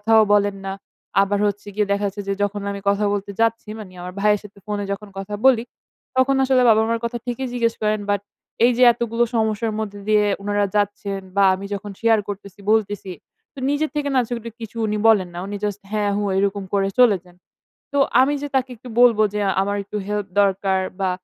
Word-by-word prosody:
কথাও 220 - +8
বলেন 205 -1 +3
না। 195 - -3 0.5
আবার 200 +1 +1
হচ্ছে 205 0 -4
গিয়ে 210 -1 +1
দেখা 200 0 +1
যাচ্ছে 200 +1 -5
যে - - +2
যখন 205 0 -2
আমি 200 0 -6
কথা 205 +1 +1
বলতে 200 0 -3
যাচ্ছি 230 -1 +1
মানে 185 -4 -10
আমার 180 0 -7
ভাইয়ের 210 0 +3
সাথে 200 -1 -14
ফোনে 205 -1 -3
যখন 205 +1 -5
কথা 195 +2 -6
বলি, 240 -3 +5 0.5
তখন 270 +1 +4
আসলে 260 -1 +3
বাবা-মার 225 +1 +3
কথা 240 +1 -2
ঠিকই 250 +2 -3
জিজ্ঞেস 230 -2 0
করেন। 210 0 +1
বাট 205 -1 +1 0.4
এই 250 - +5
যে 255 - +5
এতগুলো 235 0 0
সমস্যার 220 0 0
মধ্যে 205 -2 -5
দিয়ে 210 -1 +4 0.2
উনারা 205 0 +1
যাচ্ছেন 205 -1 -1 0.2
বা 200 - +5
আমি 195 +1 -8
যখন 200 +1 -5
শেয়ার 225 -1 +4
করতেছি, 200 -1 -8
বলতেছি, 205 -3 0 0.4
তো - - -27
নিজের 300 +2 0
থেকে 290 -1 -1
না - - +5
সেগুলি 235 -1 -5 0.4
উনি 210 0 -1
বলেন 195 -5 +4
না। 175 - -6
উনি 205 0 -4
জাস্ট 205 -1 -2
হ্যাঁ, 205 -1 0
হু 205 - -1
এইরকম 200 0 0
করে 195 -1 +2
চলে 225 -6 +6
যান। 175 0 -19 0.6
তো - - 0 0.2
আমি 285 +2 +3
যে 290 - -3
তাকে 260 0 +1
একটু 245 +2 -12
বলব 235 -3 +6
যে 210 - -1 0.2
আমার 200 +1 -1
একটু 210 +1 -6
হেল্প 205 -1 -2
দরকার 195 -1 +1 0.2
বা 190 -1 +1
210 Hz, 205 wpm, -21 LUFS, 200-230 Hz, 0.6 s, কথাও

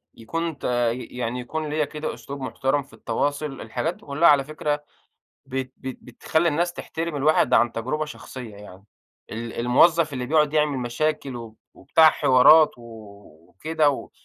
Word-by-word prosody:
يكون 165 +7 -4
تا 120 -2 0
ي 125 +2 -5
يعني 125 0 -4
يكون 155 +5 -4
ليّا 150 0 0
كده 150 +2 -5
أسلوب 140 0 -9
محترم 135 +2 -1
في 140 - -23
التواصل، 145 -1 -3
الحاجات 165 - -3
دي - - -20
كلّها 150 +4 +3
على 145 -2 +5
فكرة 150 0 -3 0.6
بت 130 -1 -4
بت 130 -1 -7
بتخلّي 160 +7 -1
الناس 170 +3 0
تحترم 165 -2 -5
الواحد 150 +3 +3
عن 120 0 +4
تجربة 130 +7 -2
شخصية 130 -6 -9
يعني، 100 -2 -13 0.5
ال 115 +1 -6
الموظف 155 +6 +4
اللي 125 -2 -4
بيقعُد 150 +1 +2
يعمل 150 -3 +1
مشاكل 135 +2 -2
وب 115 -2 -10 0.2
وبتاع 160 -1 +5
حوارات 150 +5 +6
و - - -14 0.7
وكده، 155 +6 +1
و 140 - -6
140 Hz, 160 wpm, -24 LUFS, 125-155 Hz, 0.7 s, حوارات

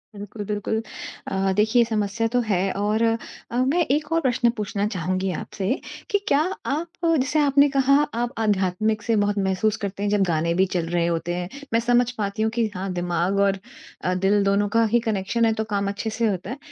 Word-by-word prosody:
बिल्कुल, 205 +1 -7
बिल्कुल। 210 +2 -1 0.5
अ, 195 0 +1
देखिए 215 +3 +3
ये - - +4
समस्या 210 0 0
तो - - +5
है 190 0 +1
और 215 +2 +1
अ, 225 0 +1 0.4
मैं 270 +8 +2
एक 295 +2 0
और 330 - +2
प्रश्न 245 -3 +2
पूछना 205 -1 -2
चाहूँगी 185 0 -1
आपसे, 190 +1 -4 0.4
कि 405 - +3
क्या 280 - +4 0.3
आप 315 +5 -2 0.2
जैसे 305 -2 +2
आपने 285 0 +4
कहा 275 0 +3 0.3
आप 240 0 -2
आध्यात्मिक 210 0 +1
से 225 +2 0
बहुत 205 0 +1
महसूस 205 +3 +1
करते 200 -1 -4
हैं 205 - +1
जब 205 0 +2
गाने 165 +1 +1
भी 185 +2 +3
चल 170 -2 0
रहे 175 -1 +1
होते 170 0 -1
हैं। 180 +1 -4 0.2
मैं 230 - +4
समझ 240 +1 +3
पाती 205 0 -2
हूँ 220 0 +1
कि 230 0 +1
हाँ, 190 +1 -3
दिमाग 175 +2 0
और 200 -1 +3 0.5
अ, 180 - +1
दिल 195 +2 +2
दोनों 200 +1 +2
का 230 - +5
ही 240 - +6
कनेक्शन 225 +1 0
है 225 - +3
तो 220 0 -2
काम 200 0 0
अच्छे 205 +2 -3
से 225 +1 0
होता 190 -1 -2
है। 255 - -4
210 Hz, 210 wpm, -23 LUFS, 190-235 Hz, 0.5 s, ही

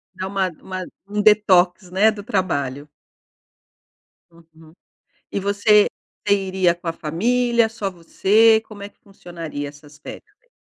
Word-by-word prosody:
Dá 185 - -4
uma 195 -1 -1
uma 185 -1 -6 0.2
um 210 +1 -2
detox, 190 -3 +3
né, 205 +4 +4
do 205 -2 -9
trabalho. 145 -8 -2 1.4
Uhum. 165 -1 -20 0.6
E - - -2
você 205 +1 +3 0.4
você 200 - +5
iria 190 -2 +1
com 175 0 -16
a 165 - 0
família, 235 +9 +1
só 200 -3 -4
você, 210 +6 +3
como 205 -2 -12
é 200 - -8
que - - -39
funcionaria 170 -7 -8
essas 145 +1 -16
férias 420 - -12
ai? - - -37
190 Hz, 140 wpm, -21 LUFS, 165-210 Hz, 1.4 s, você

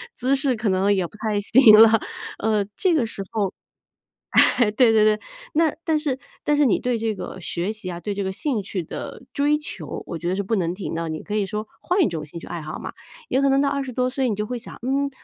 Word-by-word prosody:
姿 255 +2 0
势 270 -2 +1
可 220 -1 -1
能 190 +2 +3
也 185 -2 0
不 215 - -17
太 215 -2 -1
行 225 0 +7
了。 225 0 +7 0.4
呃， 215 -1 +1
这 370 -3 +2
个 270 -7 +2
时 220 -3 -6
候 205 -4 -1 0.8
哎 235 -4 +5
对 235 +1 +5
对 215 -1 +5
对， 215 0 +3 0.3
那 315 -1 +3
但 320 -2 +2
是 295 -4 -1 0.3
但 295 - +2
是 295 - +4
你 - - +3
对 245 -1 -1
这 225 0 -1
个 190 - -7
学 175 +3 -3
习 210 -4 -7
啊， 170 - -5
对 200 +4 -3
这 200 - -2
个 190 - -1
兴 235 +1 -2
趣 190 -1 -4
的 - - -7
追 295 +1 +2
求， 300 - -7
我 170 - -5
觉 170 - -3
得 185 - 0
是 200 - 0
不 225 - 0
能 175 -3 0
停 190 -3 -5
的。 165 0 -3
你 155 -1 -5
可 210 - -4
以 210 -1 +1
说 215 +2 -4
换 360 +2 +1
一 - - +2
种 160 -3 -4
兴 150 +3 -9
趣 - - -10
爱 170 -2 -5
好 155 - -6
嘛， - - -6 0.4
也 260 - +2
可 275 - +3
能 270 0 +3
到 280 - +2
20 275 -2 -2
多 250 +1 0
岁 260 0 -1
你 210 - -1
就 210 +1 -2
会 250 - -4
想， 235 - -11
嗯， 275 +3 0
220 Hz, 270 characters per minute, -23 LUFS, 195-270 Hz, 0.8 s, 行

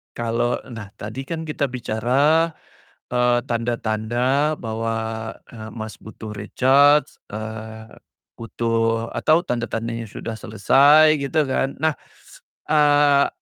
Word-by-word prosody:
kalau 120 +1 -1 0.2
nah 110 -3 -7
tadi 110 +6 -7
kan 165 -1 -4
kita 145 - -1
bicara, 130 +7 +1 0.6
eee, 125 0 +2
tanda-tanda 120 +5 0
bahwa, 115 -2 -3 0.6
eee, 110 -2 -9
Mas, 110 -2 -6
butuh 110 0 -10
recharge, 135 +7 +3
eee, 110 +1 -8 0.5
butuh 115 0 -1
atau 160 +2 +2
tanda-tandanya 115 - -3
sudah 110 +2 -7
selesai, 140 +9 +5
gitu 140 +3 0
kan. 135 +1 0
Nah, 160 -1 +1 0.7
eee, 145 -2 +4
120 Hz, 105 wpm, -22 LUFS, 110-140 Hz, 0.7 s, selesai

